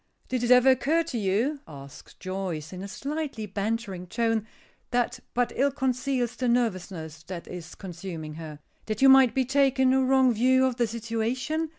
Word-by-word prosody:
"Did 255 -2 -1
it 240 - 0
ever 250 +1 +7
occur 300 +6 +2
to 320 -7 -5
you," 220 +9 0
asks 140 -2 -12
Joyce, 185 -4 -5
in 185 - -7
a 200 - -5
slightly 280 0 -4
bantering 200 -2 -3
tone, 225 +2 0 0.4
that 245 +1 0 0.2
but 245 0 +1
ill 275 +3 +3
conceals 255 -2 -1
the 250 +2 -2
nervousness 185 -9 -2
that 180 -2 -7
is 175 -2 -8
consuming 170 -4 -7
her, 155 -1 -8 0.3
"that 215 +3 -1
you 270 - +8
might 265 -2 +6
be 260 -1 +2
taking 265 -1 +3
a 265 0 +3
wrong 260 -1 +4
view 260 +3 +3
of 255 -2 -1
the 240 -2 +2
situation? 235 +8 -2
235 Hz, 175 wpm, -27 LUFS, 190-260 Hz, 0.4 s, you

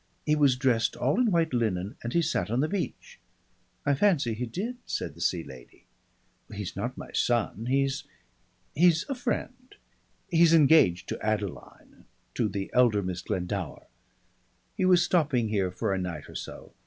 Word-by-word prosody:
He 150 - +3
was 140 -4 +4
dressed 125 -4 +1
all 135 - +1
in 250 -3 +3
white 165 -5 +1
linen 105 -5 -1
and 120 - -4
he 170 +5 +2
sat 105 - -1
on 120 +4 +1
the 155 - +1
beach." 195 +1 -5 0.7
"I 145 - +3
fancy 145 - +2
he 120 +3 -4
did," 215 - -4
said - - -4
the 85 - -13
Sea 85 0 0
Lady. 65 -4 -14 0.7
"He's - - -6
not - - -4
my - - -9
son. 115 -1 0
He's 135 +1 0 0.7
he's 165 +1 +3
a - - 0
friend. 250 0 -4 0.5
He's 165 -2 +5
engaged 145 - +5
to - - -5
Adeline, 105 -3 -4 0.3
to 110 - 0
the 100 -1 -4
elder 115 -5 +4
Miss 90 -1 -4
Glendower. 90 -3 -4 0.9
He 185 - 0
was 180 -2 +5
stopping 145 -12 +1
here 100 -3 0
for 90 +2 -2
a 95 - -1
night 85 -5 -5
or - - -12
so. - - -8
125 Hz, 165 wpm, -28 LUFS, 100-165 Hz, 0.9 s, He's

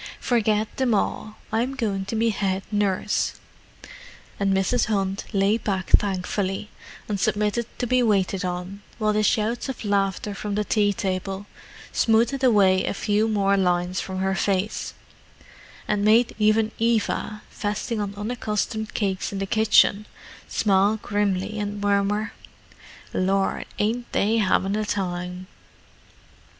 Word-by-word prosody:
"Forget 215 -3 0
them 255 -4 +2
all: 215 +1 -2 0.2
I'm 245 +5 0
going 200 -6 -2
to 200 - -4
be 225 +1 +2
head 195 -2 -1
nurse." 205 0 0 1.1
And 200 -1 +2
Mrs. 195 +5 +2
Hunt 195 -3 -1
lay 200 +2 +2
back 190 -4 -3
thankfully, 195 +1 +1 0.4
and 205 -2 -2
submitted 210 +4 0
to - - -1
be 255 +1 +2
waited 195 -4 +1
on, 180 +2 -4 0.2
while 215 -1 +1
the 215 - +2
shouts 220 +4 0
of 255 -4 -5
laughter 200 0 0
from 205 0 -4
the 210 - +1
tea 205 -1 +2
table 195 0 -3 0.5
smoothed 235 +4 +2
away 195 -6 +4
a - - -2
few 210 +2 +1
more 200 -2 +2
lines 180 -1 +1
from 190 -1 -5
her 190 0 0
face, 195 +2 -1 0.9
and 205 -1 0
made 225 +3 +4
even 215 +1 +3
Eva, 220 -2 0
feasting 210 +2 -2
on 200 -1 -4
unaccustomed 215 0 -3
cakes 195 -3 -1
in 200 - -4
the 195 - -1
kitchen, 210 0 +3 0.4
smile 200 +1 +2
grimly 205 0 -1
and 205 0 -3
murmur, 205 +1 0 0.8
"Lor, 195 +1 0
ain't 235 +3 -1
they 220 +3 +2
'avin' 195 0 +2
a 215 - 0
time!" 180 -3 -3
205 Hz, 135 wpm, -24 LUFS, 195-215 Hz, 1.1 s, away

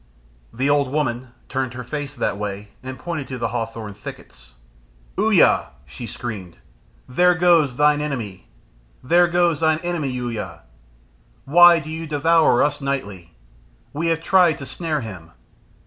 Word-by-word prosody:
The 130 +4 -1
old 145 -2 +2
woman 130 -4 -1 0.2
turned 130 -2 -3
her 125 - -6
face 145 +3 -5
that 100 - -2
way, 105 0 -5
and 130 0 -7
pointed 160 -1 -5
to 130 - -5
the 115 -1 -2
hawthorn 115 -2 -5
thickets. 65 - -12 0.6
"Uya," - - +4 0.2
she 115 - -8
screamed, 100 -9 -7 0.5
"there 180 +8 +3
goes 165 -7 +3
thine 150 +1 +3
enemy! 115 - -5 0.6
There 175 +6 +4
goes 175 -3 +2
thine 160 -1 +2
enemy, 175 -5 -2
Uya! 115 -9 -5 0.8
Why 175 +4 +7
do 155 0 -8
you 160 +1 -5
devour 155 -2 +3
us 145 0 -1
nightly? 100 -11 -4 0.6
We 160 +4 -2
have 165 -1 0
tried 175 -5 +4
to 140 - -8
snare 155 -1 -3
him! 90 -8 -9
140 Hz, 145 wpm, -21 LUFS, 115-160 Hz, 0.8 s, Why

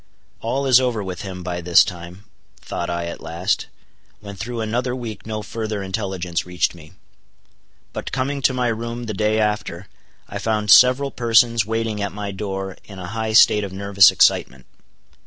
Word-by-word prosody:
All 135 +5 -2
is 130 -2 +6
over 120 -5 -1
with 90 -3 -6
him, 95 -3 -7
by 90 0 -4
this 85 0 +6
time, 90 +2 -8 0.4
thought 85 - -5
I 85 0 -2
at 85 - -7
last, 85 +5 -2 0.5
when 100 -1 -9
through 115 +4 -5
another 120 +3 -2
week 115 -4 -7
no 110 -1 -4
further 110 -3 -4
intelligence 95 -3 -3
reached 90 0 -1
me. 80 -3 -15 1.0
But - - -5
coming 135 +2 -2
to 130 - +3
my 125 -1 0
room 115 +1 -4
the 110 -2 -4
day 110 +2 +1
after, 105 -4 -2 0.4
I - - -6
found 105 -2 0
several 130 +5 +6
persons 115 -2 +3
waiting 115 -1 -2
at 100 - -2
my 100 -1 -5
door 95 -1 -5
in 100 - -12
a 90 -1 -7
high 110 -1 -2
state 105 -1 +6
of 100 - -5
nervous 100 0 +5
excitement. - - +2
105 Hz, 175 wpm, -21 LUFS, 95-115 Hz, 1.0 s, is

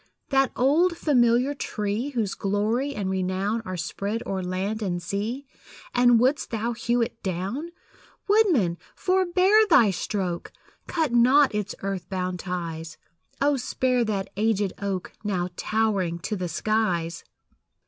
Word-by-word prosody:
That 270 -1 +3
old 330 +7 +3
familiar 250 -2 +3
tree, 215 -1 -3
Whose 230 -8 -1
glory 220 +8 -1
and 200 -2 -2
renown 190 +4 -1
Are 185 0 -4
spread 200 +6 -3
o'er 190 -1 -2
land 190 +4 -2
and 180 -4 -1
sea 210 +9 -3 0.5
And 245 -1 +5
wouldst 260 +5 +1
thou 230 +1 -2
hew 235 +1 +1
it 230 - -6
down? 195 - -3 0.6
Woodman, 340 - +3 0.2
forebear 375 +3 +3
thy 240 - +6
stroke! 185 -2 -3 0.4
Cut 320 -6 0
not 260 +4 +5
its 210 -2 -2
earth 195 -3 -3
bound 185 -1 -2
ties; 165 -3 -5 0.4
Oh, 285 0 +3
spare 255 0 0
that 200 -3 -2
aged 210 -3 +1
oak, 195 -2 -3
Now 185 -4 -1
towering 200 -7 0
to 210 - -2
the 180 -3 -3
skies! 175 -3 -1
215 Hz, 135 wpm, -25 LUFS, 185-255 Hz, 0.6 s, thy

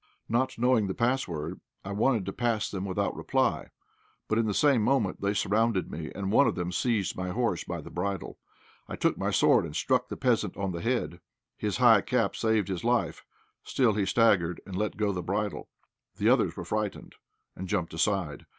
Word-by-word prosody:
Not 125 +3 0
knowing 120 -3 +3
the 95 - -3
pass 125 +3 +1
word, 80 +1 -5 0.3
I 100 - -5
wanted 110 0 +1
to 95 - -4
pass 115 -3 -1
them 95 -1 -4
without 95 -2 -1
reply, - - 0 0.6
but 110 - +1
in 115 - +1
the 105 - 0
same 140 -6 +4
moment 110 -5 +1
they 100 +1 0
surrounded 110 -1 +1
me, 80 0 -6
and 100 0 -3
one 140 +6 +5
of - - 0
them 90 0 -3
seized 105 0 0
my 90 0 -3
horse 115 -3 -1
by - - -5
the - - -11
bridle. 95 +2 -4 0.5
I - - -5
drew - - +1
my - - -2
sword, - - +4
and - - -7
struck - - +1
the - - -5
peasant - - 0
on 100 0 -2
the 85 -1 -5
head. 115 -7 -1 0.4
His 105 -3 -2
high 115 -4 +6
cap 125 +2 0
saved 110 -3 +1
his 95 -3 -4
life; 120 0 0 0.4
still, 125 -5 +2
he 100 -2 0
staggered, 95 -6 +3
and 95 - -7
let 105 +2 -2
go 105 -1 +1
the 90 -2 -3
bridle. 100 +3 -3 0.5
The - - +2
others - - +2
were - - -5
frightened, 105 -2 -3 0.4
and 95 - -6
jumped 85 -3 -1
aside. 85 -2 -1
105 Hz, 200 wpm, -28 LUFS, 95-115 Hz, 0.6 s, high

